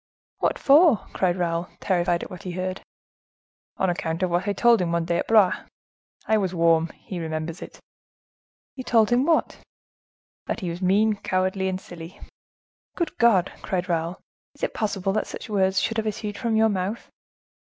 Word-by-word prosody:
"What -, -, +1 dB
for?" 290 Hz, -, +5 dB
cried 180 Hz, -2 st, +1 dB
Raoul, 170 Hz, -1 st, -1 dB
terrified 175 Hz, -2 st, 0 dB
at -, -, -9 dB
what 180 Hz, 0 st, -8 dB
he 185 Hz, -3 st, -6 dB
heard. 185 Hz, +1 st, -3 dB, 1.0 s
"On 190 Hz, -, +1 dB
account 165 Hz, -1 st, -2 dB
of 180 Hz, -, 0 dB
what 175 Hz, +3 st, 0 dB
I 205 Hz, -, +1 dB
told 235 Hz, -1 st, +4 dB
him 170 Hz, -2 st, -1 dB
one 170 Hz, -1 st, 0 dB
day 170 Hz, 0 st, 0 dB
at -, -, -3 dB
Blois. 215 Hz, -5 st, +5 dB, 0.7 s
I 220 Hz, 0 st, +2 dB
was 190 Hz, -2 st, -2 dB
warm; 165 Hz, -1 st, +3 dB
he 185 Hz, -, -7 dB
remembers 160 Hz, +1 st, -4 dB
it." -, -, -9 dB, 1.0 s
"You 255 Hz, -, -7 dB
told 225 Hz, -2 st, +3 dB
him 250 Hz, +3 st, +3 dB
what?" 330 Hz, -, +1 dB, 0.9 s
"That -, -, -3 dB
he 180 Hz, -3 st, -2 dB
was 170 Hz, +2 st, -7 dB
mean, 205 Hz, +3 st, +3 dB
cowardly, 190 Hz, 0 st, -1 dB
and 185 Hz, 0 st, -2 dB
silly." 170 Hz, -1 st, -11 dB, 0.8 s
"Good 340 Hz, -, -2 dB
God!" 200 Hz, -7 st, +4 dB
cried 180 Hz, -1 st, -2 dB
Raoul, 170 Hz, 0 st, -2 dB, 0.4 s
"is -, -, -15 dB
it -, -, -1 dB
possible 195 Hz, -3 st, -1 dB
that 215 Hz, -, -1 dB
such -, -, -8 dB
words 190 Hz, -2 st, +2 dB
should 225 Hz, -, -1 dB
have 220 Hz, 0 st, -1 dB
issued 210 Hz, 0 st, -4 dB
from 230 Hz, 0 st, -1 dB
your 220 Hz, 0 st, +4 dB
mouth?" 195 Hz, +3 st, -3 dB
190 Hz, 180 wpm, -24 LUFS, 175-215 Hz, 1.0 s, for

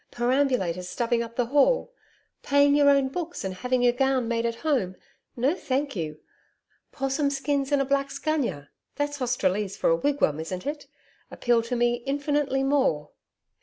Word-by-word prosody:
Perambulators 240 Hz, -9 st, 0 dB
stuffing 235 Hz, +2 st, 0 dB
up 230 Hz, 0 st, -6 dB
the 245 Hz, -, +1 dB
hall; 295 Hz, -, +2 dB, 0.5 s
paying 285 Hz, 0 st, +4 dB
your 290 Hz, -1 st, +5 dB
own 275 Hz, -1 st, +4 dB
books 340 Hz, +4 st, -5 dB
and 190 Hz, -1 st, -3 dB
having 250 Hz, +6 st, -1 dB
your 245 Hz, -1 st, +4 dB
gown 265 Hz, -1 st, +1 dB
made 230 Hz, 0 st, 0 dB
at 230 Hz, -, -3 dB
home! 245 Hz, -12 st, +1 dB, 0.4 s
No, 260 Hz, +6 st, +2 dB
thank 280 Hz, -5 st, -2 dB
you. 155 Hz, -4 st, -4 dB, 0.7 s
'Possum 270 Hz, +1 st, 0 dB
skins 280 Hz, 0 st, -1 dB
and 285 Hz, -, +3 dB
a -, -, -5 dB
black's 275 Hz, 0 st, -1 dB
gunya 235 Hz, -, -2 dB, 0.3 s
that's 290 Hz, 0 st, -2 dB
Australese 205 Hz, -5 st, 0 dB
for -, -, +2 dB
a -, -, +5 dB
wigwam, 275 Hz, -, +1 dB
isn't 180 Hz, +3 st, -5 dB
it? 290 Hz, +1 st, -5 dB, 0.4 s
appeal 240 Hz, -1 st, +1 dB
to 230 Hz, +2 st, -3 dB
me 240 Hz, 0 st, +1 dB
infinitely 285 Hz, -1 st, 0 dB
more.' 270 Hz, -, +1 dB
260 Hz, 165 wpm, -26 LUFS, 230-285 Hz, 0.7 s, your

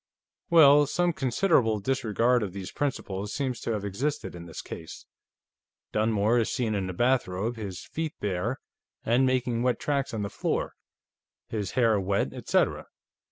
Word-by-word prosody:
"Well, 145 Hz, -4 st, +7 dB
some 175 Hz, +3 st, +1 dB
considerable 130 Hz, -, +2 dB
disregard 120 Hz, +1 st, +1 dB
of 100 Hz, -4 st, -3 dB
these 95 Hz, -2 st, -6 dB
principles 105 Hz, -8 st, -3 dB
seems 130 Hz, -4 st, -2 dB
to -, -, -3 dB
have 105 Hz, -2 st, -3 dB
existed 130 Hz, +10 st, -2 dB
in 85 Hz, -1 st, -9 dB
this 80 Hz, -, -7 dB
case. 80 Hz, -, -9 dB, 0.9 s
Dunmore 110 Hz, +1 st, +2 dB
is 115 Hz, -, 0 dB
seen 115 Hz, -4 st, -1 dB
in 95 Hz, -2 st, -1 dB
a -, -, -4 dB
bathrobe, 115 Hz, -1 st, 0 dB
his 100 Hz, -5 st, -6 dB
feet 160 Hz, -1 st, -4 dB
bare 105 Hz, +6 st, -2 dB, 0.5 s
and 125 Hz, +3 st, +3 dB
making 125 Hz, -2 st, 0 dB
wet 125 Hz, 0 st, +1 dB
tracks 140 Hz, -2 st, -1 dB
on 110 Hz, -2 st, -3 dB
the 100 Hz, -, -3 dB
floor, -, -, -2 dB, 0.8 s
his 105 Hz, -5 st, -3 dB
hair 115 Hz, -4 st, +3 dB
wet, 100 Hz, +1 st, 0 dB
etcetera. -, -, 0 dB
115 Hz, 155 wpm, -27 LUFS, 100-130 Hz, 0.9 s, Well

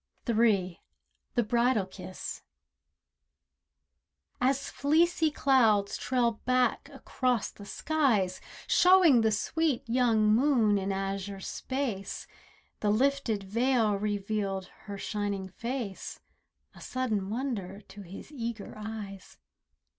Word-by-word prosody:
THE 235 Hz, -, 0 dB, 1.1 s
BRIDAL 235 Hz, -1 st, +2 dB
KISS 185 Hz, -1 st, -8 dB
III -, -, -42 dB, 2.0 s
As 275 Hz, 0 st, -2 dB
fleecy 320 Hz, +2 st, +2 dB
clouds 225 Hz, -9 st, +3 dB
trail 240 Hz, -3 st, 0 dB
back 255 Hz, 0 st, +1 dB
across 250 Hz, -4 st, -1 dB
the 205 Hz, -, -12 dB
skies, 225 Hz, -14 st, 0 dB, 0.2 s
Showing 360 Hz, -9 st, +6 dB
the 220 Hz, 0 st, +2 dB
sweet 280 Hz, +4 st, 0 dB
young 230 Hz, -3 st, +3 dB
moon 230 Hz, -5 st, +3 dB
in 195 Hz, +1 st, -2 dB
azure 195 Hz, 0 st, -3 dB
space, 240 Hz, -1 st, -4 dB, 0.5 s
The 210 Hz, -, 0 dB
lifted 235 Hz, -2 st, +1 dB
veil 230 Hz, +2 st, +2 dB
revealed 200 Hz, -1 st, -2 dB, 0.2 s
her 200 Hz, -, -4 dB
shining 200 Hz, -2 st, -3 dB
face— 230 Hz, 0 st, -5 dB, 0.5 s
A -, -, -15 dB
sudden 220 Hz, -7 st, -2 dB
wonder 215 Hz, -5 st, -4 dB
to 205 Hz, 0 st, -12 dB
his 195 Hz, -, -10 dB
eager 230 Hz, -6 st, -5 dB
eyes. 210 Hz, -3 st, -8 dB
220 Hz, 100 wpm, -29 LUFS, 200-255 Hz, 2.0 s, Showing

